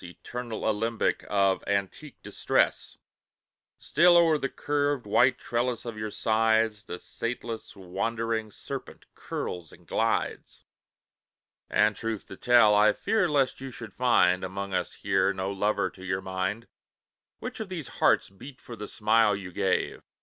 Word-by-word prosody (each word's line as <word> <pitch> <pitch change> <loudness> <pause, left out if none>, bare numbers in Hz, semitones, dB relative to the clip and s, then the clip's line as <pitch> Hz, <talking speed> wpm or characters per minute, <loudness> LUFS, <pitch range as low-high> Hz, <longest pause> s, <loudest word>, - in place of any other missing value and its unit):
Eternal 115 +6 -6
alembic 110 +1 0
of 100 -2 +2
antique 100 - -3
distress! - - 0 0.8
Still 175 +3 +5
o'er 165 -3 +4
the 135 - -2
curved, 145 -3 -1
white 125 +5 +4
trellis 120 0 -2
of 115 -2 -5
your 110 0 -4
sides 110 -1 +1
The 90 - -6
sateless, 115 +2 -5
wandering 110 +4 -2
serpent - - -8
curls 85 -3 -5
and - - -17
glides. - - -2 1.1
And 105 0 +3
truth 115 -2 -4
to - - -8
tell, 120 -1 +5
I 105 +1 +5
fear 215 -6 +1
lest 135 -3 +1
you 135 - -5
should 115 -5 -10
find, 90 -8 +3
Among 95 +1 -4
us 90 -2 -1
here, 100 - +1
no 95 +1 -3
lover 100 -1 0
to 95 - -14
your 95 0 -2
mind; 95 +4 -3 0.7
Which - - -7
of 220 -3 -5
these 170 -7 -5
hearts - - +4
beat 125 +8 -12
for 120 - -10
the 105 -1 -7
smile 110 -1 +3
you 95 -2 -7
gave? - - 0
110 Hz, 145 wpm, -27 LUFS, 100-125 Hz, 1.1 s, Still